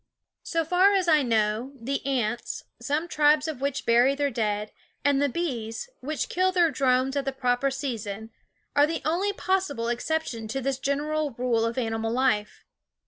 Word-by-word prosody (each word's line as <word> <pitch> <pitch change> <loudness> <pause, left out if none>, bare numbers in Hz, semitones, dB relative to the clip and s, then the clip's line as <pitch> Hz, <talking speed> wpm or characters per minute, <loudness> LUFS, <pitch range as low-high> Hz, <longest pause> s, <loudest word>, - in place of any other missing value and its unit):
So 330 -1 -1
far 370 +5 +4
as 375 -2 +1
I 310 -3 +5
know, 225 +1 0
the 270 +4 -3
ants, 240 -3 -1 0.2
some 295 +7 -1
tribes 300 -1 +3
of 300 -5 -5
which 280 0 -2
bury 240 +4 +4
their 285 0 0
dead, 210 -2 -1 0.3
and 285 -1 +3
the 285 - +2
bees, 250 - -3
which 300 +4 -3
kill 370 +1 +1
their 345 -3 +3
drones 260 0 +2
at 280 - 0
the 270 - 0
proper 250 0 +1
season, 225 -6 -4 0.4
are 290 +1 +5
the 330 - -3
only 355 +6 +1
possible 370 -12 -1
exception 240 -2 -2
to 255 +5 -2
this 270 0 -2
general 290 0 -1
rule 240 -2 +1
of 230 +2 -3
animal 225 -2 -1
life. 240 -4 0
270 Hz, 170 wpm, -26 LUFS, 235-305 Hz, 0.4 s, I